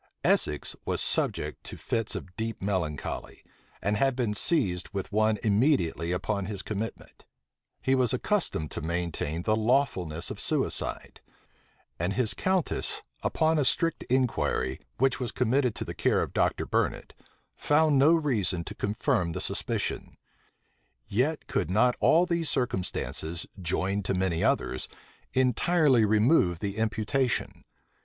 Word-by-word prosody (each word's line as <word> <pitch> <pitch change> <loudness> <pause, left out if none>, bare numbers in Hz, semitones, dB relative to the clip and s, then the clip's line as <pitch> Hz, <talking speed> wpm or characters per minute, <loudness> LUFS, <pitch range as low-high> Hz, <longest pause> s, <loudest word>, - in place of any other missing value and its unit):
Essex 75 -1 +1
was - - -1
subject - - 0
to - - -8
fits 115 -2 -2
of 90 -1 -7
deep 115 0 -3
melancholy, 90 -7 -3 0.4
and 105 +1 +1
had 135 +2 +2
been 120 -5 0
seized 105 - 0
with 100 +1 -5
one 110 +1 +2
immediately 105 - +2
upon 95 +2 -1
his 100 -2 -4
commitment: 110 +2 -6 0.6
he 130 - +2
was 130 -2 +3
accustomed 125 - 0
to - - -4
maintain 85 0 -2
the 110 - +2
lawfulness 110 - 0
of - - -6
suicide: - - -1 0.8
and 90 +4 0
his 110 -4 +1
countess 185 - -1 0.2
upon 160 0 +2
a - - +3
strict 165 +5 +1
inquiry, 125 - 0 0.2
which 135 +1 +2
was 125 -2 -3
committed 125 0 +1
to - - -4
the - - -5
care - - +2
of - - -6
Dr. - - +1
Burnet, - - -1 0.4
found 150 -1 +3
no 145 +4 +6
reason 115 - +1
to 105 - -7
confirm 105 - 0
the - - -3
suspicion: - - -3 0.9
yet 140 +9 0
could - - -1
not 120 +6 +3
all 170 +2 +5
these 170 -3 -1
circumstances, 90 -7 -2 0.2
joined 95 +3 -1
to 95 - 0
many 90 -3 0
others, 65 - +1 0.5
entirely 130 0 +3
remove 105 - +3
the 100 +1 -4
imputation. 110 +3 -1
110 Hz, 135 wpm, -28 LUFS, 95-135 Hz, 0.9 s, no